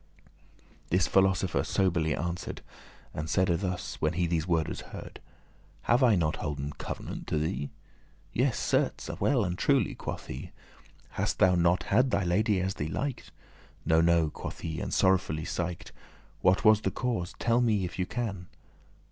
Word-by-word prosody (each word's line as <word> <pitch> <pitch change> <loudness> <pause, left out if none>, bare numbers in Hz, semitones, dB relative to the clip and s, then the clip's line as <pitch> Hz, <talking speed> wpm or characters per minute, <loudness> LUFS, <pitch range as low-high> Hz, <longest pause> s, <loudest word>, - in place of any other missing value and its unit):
This 90 0 +3
philosopher 95 -2 +2
soberly* 85 -6 +1
answer'd, 85 +2 -4 0.5
*gravely - - -5
And 75 +1 -4
saide 95 -2 +2
thus, 90 -2 -4
when 75 - +1
he 90 +1 +1
these 85 -1 -1
wordes 80 -3 0
heard; - - -10 0.6
"Have 120 +3 +3
I 120 -5 +5
not 80 -4 0
holden 75 0 -4
covenant - - -6
to - - 0
thee?" 75 -2 -2 0.6
"Yes, - - +1
certes, - - 0
well 125 -7 +2
and 90 0 -3
truely," 135 -6 +2
quoth - - -6
he. 65 - -7 0.6
"Hast - - -1
thou 95 - +5
not 90 +1 +3
had 125 +6 +3
thy 100 - +1
lady 100 +3 +2
as 95 +1 -1
thee 75 - -3
liked?" 130 - -3 0.6
"No, 80 0 +4
no," 85 -2 +3
quoth - - -7
he, 80 -2 -4
and - - -4
sorrowfully 90 -5 +2
siked.* 85 -1 -3
*sighed - - -25
"What 95 +5 +3
was 110 0 +6
the - - 0
cause? 115 -9 -2
tell 120 +1 +2
me 105 -6 +2
if 90 - -7
thou 90 - 0
can." 100 -6 -4
90 Hz, 165 wpm, -29 LUFS, 80-100 Hz, 0.6 s, was